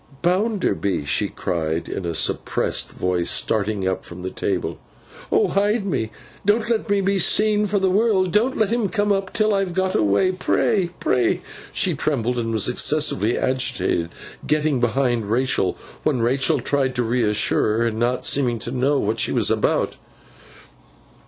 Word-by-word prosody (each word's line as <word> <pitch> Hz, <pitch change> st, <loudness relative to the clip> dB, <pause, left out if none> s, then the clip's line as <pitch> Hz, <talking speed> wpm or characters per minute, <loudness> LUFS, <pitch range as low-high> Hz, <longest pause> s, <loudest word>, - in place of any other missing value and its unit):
'Bounderby!' 180 Hz, -, 0 dB
she 75 Hz, -, +1 dB
cried, 80 Hz, -1 st, -3 dB
in 90 Hz, -, -4 dB
a 85 Hz, -, -3 dB
suppressed -, -, 0 dB
voice, 90 Hz, -1 st, -1 dB
starting 105 Hz, -3 st, 0 dB
up 95 Hz, -, -2 dB
from 90 Hz, +1 st, -10 dB
the 95 Hz, -, -4 dB
table. -, -, -3 dB, 0.5 s
'Oh -, -, +3 dB
hide 205 Hz, +2 st, +1 dB
me! 115 Hz, -, -1 dB, 0.3 s
Don't 215 Hz, +3 st, +2 dB
let 225 Hz, -1 st, -1 dB
me 200 Hz, -1 st, +2 dB
be 195 Hz, 0 st, +1 dB
seen 210 Hz, +3 st, +3 dB
for 205 Hz, +1 st, 0 dB
the 190 Hz, -1 st, +1 dB
world. 195 Hz, -3 st, +2 dB
Don't 235 Hz, +7 st, +1 dB
let 220 Hz, -1 st, +1 dB
him 230 Hz, -5 st, 0 dB
come 205 Hz, 0 st, 0 dB
up 195 Hz, -1 st, -1 dB
till 215 Hz, -2 st, +1 dB
I've 195 Hz, -3 st, -1 dB
got 190 Hz, 0 st, 0 dB
away. 105 Hz, -, +2 dB
Pray, 185 Hz, 0 st, 0 dB
pray!' 125 Hz, -2 st, +1 dB, 0.3 s
She -, -, 0 dB
trembled, 125 Hz, -4 st, -1 dB
and 115 Hz, -1 st, -2 dB
was 110 Hz, -3 st, +1 dB
excessively 125 Hz, -4 st, +2 dB
agitated; 130 Hz, -9 st, 0 dB, 0.4 s
getting 150 Hz, -3 st, +1 dB
behind 120 Hz, -2 st, 0 dB
Rachael, 120 Hz, -5 st, +1 dB, 0.2 s
when 130 Hz, -6 st, 0 dB
Rachael 130 Hz, +3 st, +2 dB
tried 135 Hz, -3 st, 0 dB
to 125 Hz, -, +1 dB
reassure 110 Hz, -2 st, +1 dB
her; 115 Hz, -, +1 dB
and 110 Hz, -1 st, -2 dB
not 120 Hz, +1 st, 0 dB
seeming 125 Hz, -4 st, +2 dB
to -, -, -6 dB
know 135 Hz, +3 st, +1 dB
what 110 Hz, -3 st, -1 dB
she -, -, +1 dB
was -, -, +2 dB
about. -, -, 0 dB
130 Hz, 165 wpm, -22 LUFS, -, 0.5 s, Oh